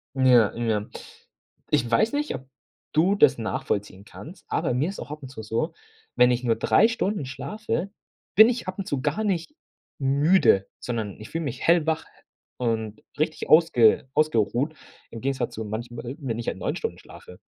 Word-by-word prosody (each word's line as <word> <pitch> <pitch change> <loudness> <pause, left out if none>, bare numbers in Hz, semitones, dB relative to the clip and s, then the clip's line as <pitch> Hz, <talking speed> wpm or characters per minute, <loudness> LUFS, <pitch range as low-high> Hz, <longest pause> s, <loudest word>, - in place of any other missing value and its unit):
Ja, 125 -5 +5
ja, 110 -3 -1 0.9
ich 120 - +2
weiß 120 - +2
nicht, 295 +1 -1
ob 130 - -9 0.5
du 175 +6 +3
das 145 -9 +5
nachvollziehen 100 -3 -3
kannst. - - -12
Ah, - - -1
bei - - 0
mir 140 +6 +1
ist 195 - -7
auch 125 - -8
ab 150 -2 -8
und 130 - -8
zu 120 -4 -8
so, 115 +10 -2 0.4
wenn 125 0 +5
ich 125 +1 -1
nur 115 -2 +2
3 220 - +4
Stunden 210 - -2
schlafe, 195 - -4 0.5
bin 220 +2 +9
ich 240 -5 -3
ab 185 - -4
und 190 - -4
zu 140 -2 -2
gar 150 +10 -1
nicht 195 - -2 0.4
müde, 140 - +3
sondern 110 -5 -4
ich 110 - -10
fühle 165 0 -2
mich 130 -2 -5
hellwach 160 -2 +2 0.5
und 110 -3 -2 0.2
richtig 155 0 -2
ausge 135 -8 +5
ausgeruht, 135 0 +1 0.4
im 115 - -7
Gegensatz 135 -1 -2
zu 110 - -5
manchmal, 120 +4 -6
wenn 120 -5 -3
ich 120 - -6
halt - - -2
9 - - -2
Stunden - - -4
schlafe. 90 - -14
130 Hz, 180 wpm, -25 LUFS, 115-165 Hz, 0.9 s, bin